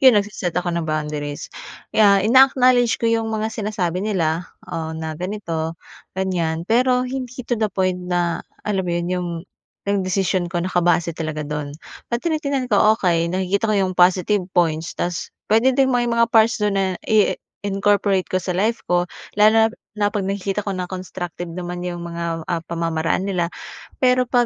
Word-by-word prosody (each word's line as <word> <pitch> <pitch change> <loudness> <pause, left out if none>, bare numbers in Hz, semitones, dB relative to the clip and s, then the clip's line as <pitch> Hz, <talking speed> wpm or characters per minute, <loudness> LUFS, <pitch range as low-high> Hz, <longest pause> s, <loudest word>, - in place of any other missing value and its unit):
yun, 260 -4 +7
nagse-set 200 -4 -1
ako 175 -1 0
ng 170 -2 -2
boundaries. 150 -1 -3 0.4
Kaya, 200 -2 +5
ina-acknowledge 250 -1 +5
ko - - -5
yung 230 -1 +2
mga 220 0 -2
sinasabi 200 -5 -2
nila, 175 -5 -1 0.2
oo 160 0 -5
na 160 0 -4
ganito 165 -2 -4 0.4
ganyan. 170 -4 -1
Pero 250 +4 +3
hindi 255 -1 -5
to 235 -2 -2
the 215 - +2
point 185 -2 -1
na 175 -1 0 0.2
alam 205 -2 0
mo 180 -2 -3
yun, 175 - -2
yung 180 -1 -2 0.6
nagdesisyon 190 -2 0
ko 175 0 -2
naka-base 175 -2 +2
talaga 155 -1 -4
dun. 150 0 -4 0.4
'Pag 235 +4 -2
tinitingnan 285 -5 0
ko, 215 +2 +5
okey 170 -4 +1
nakikita 190 +4 0
ko 215 - +2
yung 190 -2 +1
positive 185 +2 +3
points 165 -2 +1
tas 175 -1 -2 0.2
pwede 225 +5 +4
din 270 - +5
may 240 -1 +1
mga 235 0 +3
parts 225 0 +4
dun 210 -1 +1
na 190 -2 0
i-incorporate 200 -2 +1
ko - - -8
sa 185 - -3
life 210 +6 0
ko 175 0 +3 0.3
lalo 210 +1 +7
na 225 0 +6 0.3
na 210 -1 +1
'pag 200 -2 -2
nakikita 195 +1 -2
ko 200 - -1
na 180 -1 -4
constructive 180 -2 -6
naman 175 +1 -5
yung 175 -1 -4
mga, 170 -1 -4
ah, 170 - +1
pamamaraan 165 +3 -1
nila. 175 -3 0 0.5
Pero 250 -1 +3
'pag 245 -1 +3
190 Hz, 170 wpm, -21 LUFS, 175-215 Hz, 0.6 s, yun